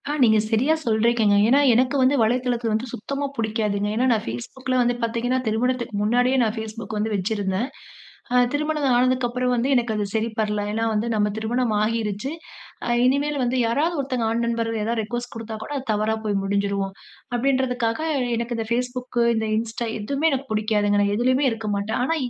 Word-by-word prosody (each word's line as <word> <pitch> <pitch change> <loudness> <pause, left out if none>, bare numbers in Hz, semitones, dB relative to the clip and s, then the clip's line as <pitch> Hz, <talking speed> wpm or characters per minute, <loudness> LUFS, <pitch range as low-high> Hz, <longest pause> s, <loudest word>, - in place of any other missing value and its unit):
ஆ. - - 0
நீங்க 220 -2 +5
சரியா 255 +8 +3
சொல்றீக்கங்கங்க. 220 -2 +3
ஏனா, 270 +3 +5
எனக்கு 255 +4 +2
வந்து 260 +2 +4
வலைதளத்தில 240 0 +1
வந்து 220 +4 -1
சுத்தமா 275 +6 -3
புடிக்காதுங்க. 215 -3 -1
ஏனா, 245 +3 +2
நான் 220 - -1
Facebookல 255 - -3
வந்து 245 0 +2
பார்த்தீங்கன்னா, 235 +3 0
திருமணத்துக்கு 235 +1 -1
முன்னாடியே 245 +4 +2
நான் 220 -1 0
Facebook 220 -1 -7
வந்து 215 +1 0
வச்சிருந்தேன். 200 +2 -1 0.7
அ - - +3 0.2
திருமணம் 300 0 0
ஆனதுக்கப்புறம் 250 0 +1
வந்து 245 +3 0
எனக்கு 240 -3 +1
அது 210 - 0
சரிப்படல. 220 -2 -1
ஏனா, 225 +1 -1
வந்து 215 +2 0
நம்ம 210 -1 +1
திருமணம் 230 +1 0
ஆகிருச்சு 220 +2 -2 0.7
இனிமேல் 280 +3 +1
வந்து, 245 +1 0
"யாராவது 310 +9 0
ஒருத்தங்க 255 -3 -2
ஆண் 230 +1 0
நண்பர் 230 -1 -1
ஏதாவது 230 +1 -1
ரிக்வெஸ்ட் 240 +3 -5
குடுத்தா 225 -1 -6
கூட 290 - -9
அது 265 - -5
தவறா 215 +1 0
போய் 205 -1 0
முடிஞ்சிரும்." 200 0 -1 0.4
அப்டின்றதுக்காக 250 -2 0 0.4
எனக்கு 235 +1 -3
இந்த 225 - -2
Facebook 250 0 -3 0.2
இந்த 220 0 -1
Insta, 230 +1 -3
எதுவுமே 280 +9 +1
எனக்கு 270 0 -3
புடிக்காதுங்க 210 -1 +1
நான் 200 0 +1
எதுலயுமே 255 +4 +2
இருக்க 220 -1 -4
மாட்டேன். 205 +4 -2
ஆனா 325 +6 +1
230 Hz, 165 wpm, -23 LUFS, 215-255 Hz, 0.7 s, நீங்க